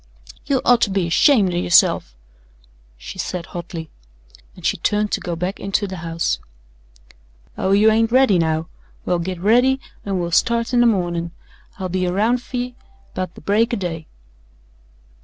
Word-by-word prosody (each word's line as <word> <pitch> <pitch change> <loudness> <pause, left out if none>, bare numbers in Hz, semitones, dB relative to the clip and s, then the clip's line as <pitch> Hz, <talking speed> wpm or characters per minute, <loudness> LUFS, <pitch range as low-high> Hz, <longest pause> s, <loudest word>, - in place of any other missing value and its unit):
"You 270 -3 +1
oughter 240 -3 +4
be 190 -2 0
ashamed 190 - +4
o' - - -1
yourself," 175 - +3 0.8
she - - -10
said 180 -2 -3
hotly, 170 -3 -7 0.6
and - - -12
she - - +2
turned 210 0 0
to - - 0
go 175 - -3
back 180 +4 -3
into 195 +1 -1
the 190 -1 -6
house. 165 0 -2 1.2
"Oh, 190 - -1
you 210 +2 +5
ain't 225 +1 +2
ready 255 -7 +4
now. 160 0 0 0.4
Well, 175 -1 0
git 180 +1 -4
ready 245 +7 +3 0.2
an' 195 -2 -2
we'll 170 -1 -3
start 235 +7 +1
in 245 - +4
the 240 - +5
mornin'. 175 -5 -1 0.4
I'll 190 -1 -3
be 185 0 -1
aroun' 215 +7 +1
fer 245 +1 -7
ye 245 0 -4 0.4
'bout 185 -1 -4
the - - -12
break 220 - +1
o' - - -4
day." 165 -4 -5
190 Hz, 165 wpm, -20 LUFS, 170-230 Hz, 1.2 s, you